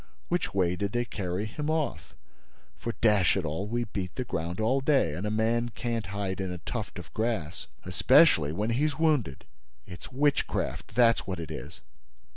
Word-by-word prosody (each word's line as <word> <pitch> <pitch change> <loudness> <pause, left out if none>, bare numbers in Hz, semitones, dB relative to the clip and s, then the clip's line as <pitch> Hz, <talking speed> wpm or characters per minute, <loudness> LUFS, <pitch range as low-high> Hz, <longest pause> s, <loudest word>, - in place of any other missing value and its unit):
Which 175 -1 0
way 90 -2 +1
did 100 +2 -3
they 120 0 +1
carry 95 -2 -3
him 150 +8 -4
off? 155 -2 -2 0.6
For, 115 - -4
dash 105 -5 +4
it 95 - -1
all, 80 +7 -2
we 120 +2 -1
beat 95 -5 -5
the 130 - -2
ground 85 -5 -3
all 125 +5 +2
day; 135 - +3
and 90 +7 -3
a - - 0
man 115 +2 +1
can't 115 -3 -3
hide 95 -1 -3
in 95 -1 -3
a 90 - -4
tuft 85 - -5
of - - -10
grass, 110 -9 -2 0.2
especially 90 - +5
when 105 +8 -1
he's 145 +5 +1
wounded! 150 - +1 0.4
It's 90 +6 -10
witchcraft, 140 -6 0
that's 115 -1 +4
what 95 -2 -3
it 80 - -6
is! - - -8
110 Hz, 180 wpm, -28 LUFS, 90-120 Hz, 0.6 s, especially